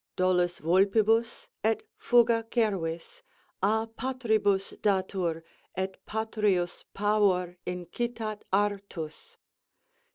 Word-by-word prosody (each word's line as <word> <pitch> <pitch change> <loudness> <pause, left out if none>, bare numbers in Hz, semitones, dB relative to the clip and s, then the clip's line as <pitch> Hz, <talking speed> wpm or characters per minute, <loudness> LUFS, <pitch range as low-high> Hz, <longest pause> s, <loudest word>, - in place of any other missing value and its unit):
dolus 180 -1 +2
vulpibus, 215 +7 +2 0.2
et 220 +1 +1
fuga, 235 -1 +3
cervis 195 - -1 0.4
A 220 +3 +2
patribus 225 -5 0
datur, 185 -5 0 0.3
et 190 0 -4
patrius 210 -5 0
pavor 200 -4 +2
incitât 215 +5 -4
artus? 200 -5 -2
205 Hz, 75 wpm, -28 LUFS, 180-220 Hz, 0.4 s, fuga